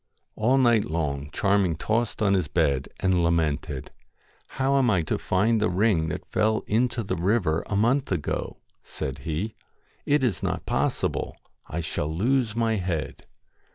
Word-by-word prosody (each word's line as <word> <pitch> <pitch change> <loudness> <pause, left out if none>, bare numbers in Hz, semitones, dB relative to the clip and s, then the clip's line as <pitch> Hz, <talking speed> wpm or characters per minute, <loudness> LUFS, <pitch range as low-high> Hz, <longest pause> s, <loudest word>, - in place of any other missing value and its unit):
All 125 +5 +2
night 120 -5 +4
long 75 -3 -2
Charming 100 -4 +2
tossed 110 +5 -1
on 100 -2 +3
his 90 -5 +1
bed, 70 -2 +1
and 90 -2 +2
lamented 80 -4 -1 0.3
' - - -35
How 135 +1 +2
am 125 -2 +3
I 90 -6 +2
to - - -2
find 105 +4 +1
the 110 - +2
ring 90 -3 +2
that 75 - -5
fell 110 +1 +1
into 120 +2 +1
the 100 - -2
river 90 -3 +1
a 100 - -2
month 120 +6 +2
ago? 85 -6 -2
' - - -44
said 70 0 -5
he. 80 +10 -3 0.3
' - - -42 0.2
It 145 -1 +3
is 115 -9 0
not - - -2
possible. - - -1 0.3
I 85 - -3
shall 75 -1 -3
lose 115 +6 +1
my 115 -1 +1
head.' 90 -5 -3
100 Hz, 170 wpm, -26 LUFS, 80-115 Hz, 0.3 s, night